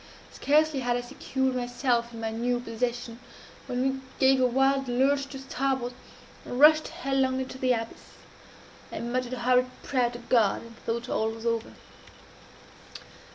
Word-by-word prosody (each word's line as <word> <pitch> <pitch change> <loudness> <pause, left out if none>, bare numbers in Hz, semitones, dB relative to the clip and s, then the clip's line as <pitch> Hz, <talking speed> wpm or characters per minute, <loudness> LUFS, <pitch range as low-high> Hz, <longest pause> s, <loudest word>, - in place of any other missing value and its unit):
Scarcely 305 0 +2
had 245 -1 0
I - - -2
secured 265 +1 -2
myself 245 -1 0
in 230 - -9
my 225 0 -2
new 240 +2 0
position, 240 0 -3 0.5
when 250 -1 -1
we 265 0 -1 0.2
gave 265 -1 +4
a 255 - +5
wild 270 +2 +2
lurch 275 +3 +2
to 275 - -8
starboard, 265 -2 -2 0.5
and 245 - -5
rushed 310 +1 +7
headlong 270 -5 0
into 260 0 -5
the 255 -1 +3
abyss. 225 -1 -6 0.8
I - - -5
muttered 245 +1 -2
a 255 - -4
hurried 250 +1 +3
prayer 250 -3 +1
to 240 - -8
God, 235 -4 +2
and 230 0 -13
thought 235 +2 -3
all 220 -2 0
was 225 +1 -8
over. 230 0 -1
250 Hz, 155 wpm, -27 LUFS, 240-270 Hz, 0.8 s, rushed